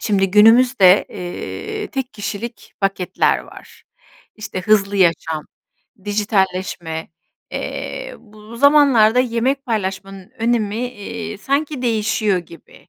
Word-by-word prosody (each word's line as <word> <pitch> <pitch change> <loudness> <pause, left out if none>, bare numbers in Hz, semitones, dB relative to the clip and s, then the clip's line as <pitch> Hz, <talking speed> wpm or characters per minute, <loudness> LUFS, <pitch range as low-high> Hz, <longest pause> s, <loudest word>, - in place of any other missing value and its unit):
şimdi 195 -3 +1
günümüzde, 215 -2 +6
eee, 415 - -6
tek 265 -4 -4
kişilik 220 +2 -6
paketler 195 -2 +1
var. - - -14 0.5
İşte, 210 -3 -5
hızlı 200 0 +2
yaşam, 165 -4 +1 0.6
dijitalleşme, 190 -5 -1 0.4
eee, - - -5
bu 215 +1 -14
zamanlarda 270 -5 +5
yemek 255 +3 0
paylaşmanın 195 -2 -4
önemi, 225 -2 0
iii, 210 -2 -7
sanki 280 +2 -2
değişiyor 215 -4 +1
gibi. 170 0 -14
215 Hz, 100 wpm, -19 LUFS, 195-240 Hz, 0.6 s, günümüzde